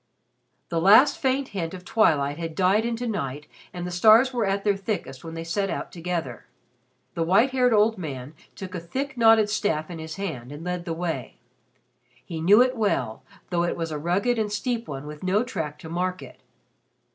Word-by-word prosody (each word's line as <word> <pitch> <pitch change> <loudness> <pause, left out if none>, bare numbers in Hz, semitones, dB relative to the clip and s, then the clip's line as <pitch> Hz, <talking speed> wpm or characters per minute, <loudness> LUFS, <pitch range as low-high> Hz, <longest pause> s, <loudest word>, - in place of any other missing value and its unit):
The 165 -1 -1
last 220 - +6
faint 265 +1 0
hint 180 -3 -4
of 180 0 -11
twilight 150 -10 +2
had 165 -1 -5
died 195 +4 +3
into 235 +1 -3
night 150 - -3 0.3
and 175 -1 -6
the 180 - -4
stars 220 +8 +5
were 235 -3 0
at 195 0 -1
their 205 -1 +2
thickest 195 - -4
when 165 0 -7
they 165 - -5
set 195 +4 -1
out - - -4
together. 170 -7 -4 0.7
The 170 - -3
white 195 +10 +3
haired 250 -1 +3
old 215 -1 +3
man 140 -4 -6 0.2
took 190 -1 -8
a 180 - -3
thick 270 +12 -4
knotted 225 -2 +5
staff 180 -6 -1
in 165 - -7
his 160 0 -7
hand 150 -11 -5
and 145 +2 -8
led 180 -1 -3
the 165 - -2
way. 165 - -4 0.9
He 165 -2 -5
knew 205 +8 +7
it 255 0 -1
well, 205 - -1 0.3
though 170 -1 +1
it 175 - -1
was 165 -1 -3
a 150 - -3
rugged 200 +9 0
and 210 -1 -1
steep 230 +2 -2
one 140 -1 -6
with 150 0 -9
no 190 +4 +1
track 160 - -4
to 155 - -11
mark 180 +2 -2
it. - - -14
180 Hz, 200 wpm, -25 LUFS, 165-220 Hz, 0.9 s, knew